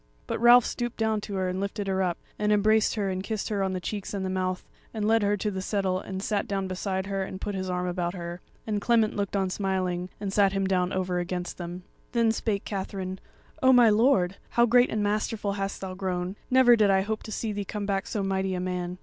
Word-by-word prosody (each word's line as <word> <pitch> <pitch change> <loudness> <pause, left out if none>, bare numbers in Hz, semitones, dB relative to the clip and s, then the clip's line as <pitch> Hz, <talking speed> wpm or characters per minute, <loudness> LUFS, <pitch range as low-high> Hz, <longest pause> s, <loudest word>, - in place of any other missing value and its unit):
But - - -3
Ralph 240 0 +8
stooped 240 -1 -3
down 220 -1 +1
to 205 -1 -6
her, 190 -1 0
and 180 +1 -2
lifted 200 +1 -3
her 190 -1 0
up, 180 -2 0 0.2
and 210 0 +1
embraced 215 +1 +3
her 200 -3 -1
and 185 0 -2
kissed 215 +1 -3
her 205 -2 -1
on 190 -1 0
the 185 - -2
cheeks 205 +2 -4
and 190 -1 -2
the 185 - -2
mouth, 185 0 -2 0.3
and 210 -1 -1
led 225 0 +4
her 205 0 +2
to 210 +2 -1
the 190 -1 -4
settle 190 -1 0
and 190 0 -6
sat 205 -1 -1
down 195 -1 -2
beside 190 +1 -2
her 195 0 -2
and 190 0 -5
put 205 - -3
his 185 -1 -3
arm 180 0 -1
about 175 0 -2
her; 175 0 -6 0.2
and 210 -2 -1
Clement 225 -1 +2
looked 200 -1 -2
on 190 -2 0
smiling, 185 -2 -1
and 200 -2 -4
sat 200 -1 +4
him 195 -1 0
down 185 -1 +1
over 185 -1 -1
against 175 0 -4
them. 175 +1 -6 0.3
Then 230 -2 +3
spake 215 -2 -2
Katherine: 190 -1 -4 0.4
"O 260 -1 +6
my 245 -3 +7
lord! 210 -5 +3
how 235 - +4
great 245 +1 +5
and 215 -1 -1
masterful 210 0 -1
hast 195 0 -3
thou 190 -1 -4
grown; 185 -1 -3
never 255 -2 +6
did 210 -3 +3
I 190 -1 +4
hope 215 +2 -3
to 215 - -9
see 220 +1 -2
thee 205 0 -3
come 205 +1 -4
back 195 -1 -1
so 205 - -2
mighty 190 -1 0
a - - -2
man." 180 0 -3
195 Hz, 245 wpm, -27 LUFS, 185-210 Hz, 0.4 s, Ralph